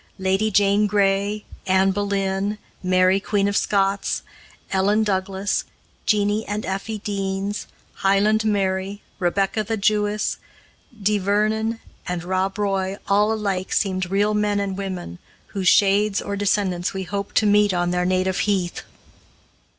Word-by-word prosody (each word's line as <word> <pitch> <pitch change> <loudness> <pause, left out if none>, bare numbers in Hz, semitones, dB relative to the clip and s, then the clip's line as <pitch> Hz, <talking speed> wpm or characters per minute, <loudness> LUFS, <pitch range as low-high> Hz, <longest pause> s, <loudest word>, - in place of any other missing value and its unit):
Lady 190 +3 +1
Jane 205 +1 +3
Grey, 200 +1 +1 0.2
Anne 190 +1 +4
Boleyn, 200 0 -1 0.2
Mary 185 +1 +3
Queen 200 0 0
of 200 - -1
Scots, 195 -1 +1 0.5
Ellen 200 +3 +2
Douglas, 195 -1 -1 0.4
Jeanie 210 0 +2
and 205 +1 -3
Effie 195 +3 -3
Deans, 200 0 -3 0.3
Highland 205 +3 +3
Mary, 195 -1 -1 0.2
Rebecca 195 +4 +1
the 220 +2 -2
Jewess, 210 +1 +1 0.7
Di 210 +1 +2
Vernon, 215 +3 0 0.3
and 180 -1 -3
Rob 190 +2 -1
Roy 195 -1 -1
all 205 +2 +4
alike 200 -4 -2
seemed 185 -4 0
real 205 +2 +2
men 210 -1 +1
and 200 -1 -2
women, 185 - -5 0.3
whose 195 -3 -2
shades 200 +1 +4
or 200 - -4
descendants 195 -3 0
we 190 - -2
hoped 200 +2 -5
to 215 - +4
meet 205 0 +4
on 175 -1 0
their 180 0 +1
native 185 0 +1
heath. 190 -4 0
200 Hz, 135 wpm, -22 LUFS, 190-210 Hz, 0.7 s, Anne